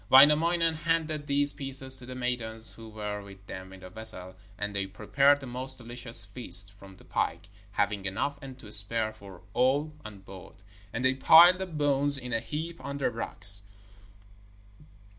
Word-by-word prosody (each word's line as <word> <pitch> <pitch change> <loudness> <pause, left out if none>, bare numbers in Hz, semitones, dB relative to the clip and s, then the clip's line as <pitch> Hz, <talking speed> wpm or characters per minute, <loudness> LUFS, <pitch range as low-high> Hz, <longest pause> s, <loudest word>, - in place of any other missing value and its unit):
Wainamoinen 160 +5 +4
handed 160 -2 -3
these 145 0 0
pieces 135 -2 -1
to 120 - -13
the 130 - -8
maidens 115 -3 -1
who 115 -1 -13
were 105 -1 -6
with 100 -1 -15
them 95 -1 -10
in 95 -1 -14
the 90 - -11
vessel, 95 -4 -4 0.2
and 105 0 -6
they 100 -1 -3
prepared 135 +9 +1
the 140 - -10
most 130 +1 -3
delicious 120 -2 +2
feast 100 -2 +5
from 100 -1 -16
the - - -19
pike, - - -4 0.2
having 100 -1 -2
enough 140 +9 -4
and 135 -2 -11
to 110 -5 -13
spare 110 +1 -2
for 100 -4 -15
all 140 +5 0
on 110 -2 -11
board. 95 -1 -14 0.4
And 120 +3 -4
they 130 - +3
piled 170 +7 +6
the 190 - -5
bones 145 -3 +3
in 125 -2 -6
a 115 - 0
heap 160 +7 -7
on 140 0 -6
the 140 - -2
rocks. 100 -2 +4
125 Hz, 175 wpm, -27 LUFS, 105-140 Hz, 0.4 s, piled